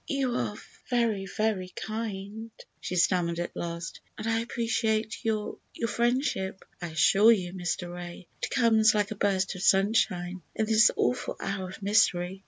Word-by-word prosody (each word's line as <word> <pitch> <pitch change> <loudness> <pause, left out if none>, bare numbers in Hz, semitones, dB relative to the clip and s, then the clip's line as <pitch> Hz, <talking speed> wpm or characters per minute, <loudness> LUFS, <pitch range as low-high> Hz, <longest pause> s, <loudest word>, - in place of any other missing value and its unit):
"You 275 -5 0
are 210 - -2 0.3
very, 225 -6 +1
very 205 -3 -1
kind," 220 0 -5 0.3
she 180 - -4
stammered 170 -1 +2
at 175 0 -4
last, 170 0 -5 0.2
"and 215 - -6
I 225 0 +2
appreciate 225 -1 -1
your—your 220 +1 -3
friendship, 235 -5 -1 0.2
I 175 - -3
assure 195 +7 +5
you, 185 -5 0
Mr. 175 -1 -3
Ray. 175 0 -8 0.2
It - - -2
comes 220 -4 +4
like 205 0 +1
a - - -3
burst 195 -2 +1
of 185 - -8
sunshine 190 -3 +2
in 220 - +1
this 215 0 +6
awful 125 - 0
hour 195 -1 -3
of 195 - -10
misery. 190 -3 +2
205 Hz, 155 wpm, -28 LUFS, 180-220 Hz, 0.3 s, this